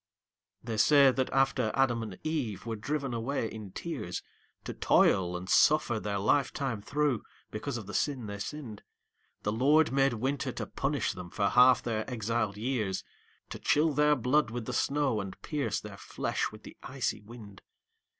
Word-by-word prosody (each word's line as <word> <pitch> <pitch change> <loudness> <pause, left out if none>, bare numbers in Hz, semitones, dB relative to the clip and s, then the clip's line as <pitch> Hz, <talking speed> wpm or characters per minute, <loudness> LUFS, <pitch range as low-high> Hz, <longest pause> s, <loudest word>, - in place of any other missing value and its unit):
They 115 -2 -4
say 140 +3 +6
that 130 0 -1
after 135 -4 +2
Adam 125 -4 +2
and 105 -5 -6
Eve 140 - -2
were 115 -1 -3
driven 135 +4 -3
away 115 +1 -1
in 110 -3 -8
tears - - -5 0.4
To - - -5
toil 90 -1 +3
and 90 +1 -8
suffer 140 -1 +4
their 105 -1 -2
life 130 +8 +2
time 130 -7 -3
through, 140 +1 0 0.3
because - - -4
of 110 - -7
the 100 - -8
sin 130 +3 -1
they 100 -1 -6
sinned, 115 -2 -6 0.6
The 105 - 0
Lord 145 +8 +4
made 135 -1 +3
Winter 135 +5 -2
to - - -4
punish - - -1
them 90 - -8
for 100 +2 0
half 125 +3 +6
their 110 -1 -2
exiled 110 -3 -1
years, 110 -5 -2 0.5
To - - -6
chill 155 +1 +2
their 150 +1 +4
blood 130 +1 +2
with 120 0 -5
the - - -4
snow, 140 -6 +1
and 95 -1 -8
pierce 150 -3 -1
their - - -10
flesh - - -2
with - - -13
the - - -11
icy 125 -6 -3
wind. 105 -3 -12
120 Hz, 175 wpm, -30 LUFS, 105-140 Hz, 0.6 s, say